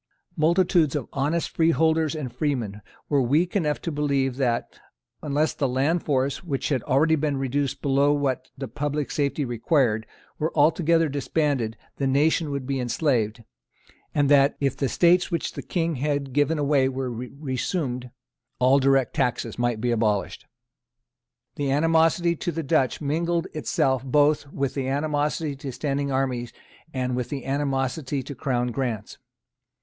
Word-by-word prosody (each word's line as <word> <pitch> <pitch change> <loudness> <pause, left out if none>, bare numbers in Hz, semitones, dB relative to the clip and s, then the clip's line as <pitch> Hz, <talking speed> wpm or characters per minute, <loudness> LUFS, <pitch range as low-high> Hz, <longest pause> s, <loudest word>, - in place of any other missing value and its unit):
Multitudes 165 -2 +3
of 140 -5 -2
honest 150 +5 -1
freeholders 160 -1 +2
and 135 -6 -5
freemen 120 -7 -2 0.3
were 145 -2 +2
weak 155 - +1
enough 150 -7 +1
to 170 - -2
believe 140 -3 0
that, 120 -4 -1 0.4
unless 150 +1 0
the 140 - 0
land 140 +7 +1
force, 140 +2 -1
which 140 -6 -2
had 135 -5 +1
already 155 +5 +3
been 145 -2 -1
reduced 135 +1 -2
below 140 +1 +3
what 140 -3 -1
the 135 0 -5
public 145 +1 -3
safety 145 0 0
required, 120 -2 +1 0.3
were 155 +2 0
altogether 165 +2 +4
disbanded, 140 -5 -1 0.2
the 135 - 0
nation 150 +3 +2
would 140 -2 -3
be 135 0 -2
enslaved, 120 -3 0 0.7
and 145 -1 +3
that, 140 0 +4
if 135 -2 0
the 135 - -1
estates 175 +5 +3
which 170 -3 -2
the - - -6
King 165 -4 -1
had 140 -1 -2
given 145 +3 +2
away 140 -2 +2
were 130 -1 -3
resumed, 125 +1 -3 0.5
all 130 +3 +4
direct 135 -2 +2
taxes 120 -3 -1
might 120 -2 0
be 120 +2 0
abolished. 110 -3 -1 1.1
The 145 -1 -1
animosity 165 +3 +3
to 175 - -2
the 165 0 -3
Dutch 140 -2 +1
mingled 165 +4 0
itself 135 -4 0
both 145 +1 +2
with 140 -1 -2
the 135 -2 -2
animosity 145 +1 -1
to 135 0 -6
standing 140 +1 -2
armies 130 -3 -1 0.4
and 125 -2 -2
with 125 -1 -3
the 140 -2 -5
animosity 135 0 -1
to 140 - -7
Crown 125 -2 -1
grants. 120 -4 -4
140 Hz, 150 wpm, -25 LUFS, 130-155 Hz, 1.1 s, altogether